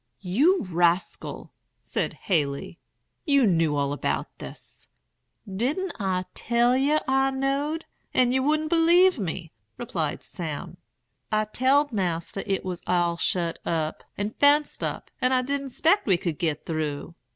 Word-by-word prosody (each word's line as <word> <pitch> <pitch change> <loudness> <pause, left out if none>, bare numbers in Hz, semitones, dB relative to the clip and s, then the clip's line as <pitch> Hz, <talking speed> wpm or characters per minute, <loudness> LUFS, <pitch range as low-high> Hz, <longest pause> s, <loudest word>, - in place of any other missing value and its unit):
"'You 270 - +3
rascal!' 175 -1 0 0.3
said - - -2
Haley; 145 -3 -2 0.4
'you 280 -6 +4
knew 165 -6 +2
all 140 0 0
about 145 - -2
this.' - - -11 0.6
"'Didn't 260 - -1
I 185 -2 0
tell 240 +1 +2
yer 285 +4 +2
I 270 0 +3
knowed, 275 +4 -1 0.3
and 250 -1 +3
yer 260 - +2
wouldn't 310 +3 +1
believe 345 0 +5
me?' 175 -3 -4 0.3
replied 165 -10 -3
Sam. 160 -5 -6 0.5
'I 215 0 +2
telled 280 +3 +3
Mas'r 180 -1 -2
't 195 -2 -1
was 180 -2 -4
all 175 -1 +2
shet 170 0 -1
up, 160 -2 -2
and 205 +2 -3
fenced 290 +1 +3
up, - - -4
and 255 0 +3
I 255 - +2
didn't 280 +1 -2
'spect 330 +9 +2
we 190 -3 +4
could 170 -3 -3
git 155 -3 -1
through. 155 0 -3
215 Hz, 140 wpm, -26 LUFS, 170-280 Hz, 0.6 s, believe